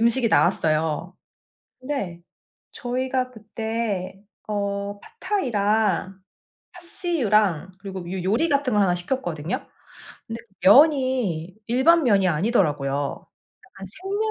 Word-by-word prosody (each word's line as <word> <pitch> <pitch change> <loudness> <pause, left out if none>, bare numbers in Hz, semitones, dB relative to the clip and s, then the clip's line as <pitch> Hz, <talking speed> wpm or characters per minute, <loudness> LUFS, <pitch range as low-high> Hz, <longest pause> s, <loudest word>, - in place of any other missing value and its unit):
음식이 235 +1 +3
나왔어요. 160 -1 +1 0.7
근데 255 -11 -4 0.5
저희가 255 0 -2
그때 220 -4 -4 0.3
어 200 -1 -2 0.2
팟타이랑, 215 - 0 0.5
파씨유랑 215 - 0
그리고 190 -3 -7
요 190 -1 -3
요리 235 - +2
같은 280 -3 +1
걸 205 - +4
하나 180 -2 +3
시켰거든요. 175 - -3 0.6
근데 230 +1 -5 0.2
면이 250 - +4
일반 285 +8 +4
면이 200 -6 +4
아니더라고요. 150 - 0 0.4
약간 195 - -11
생면 405 +3 -1
210 Hz, 240 characters per minute, -24 LUFS, 185-255 Hz, 0.7 s, 걸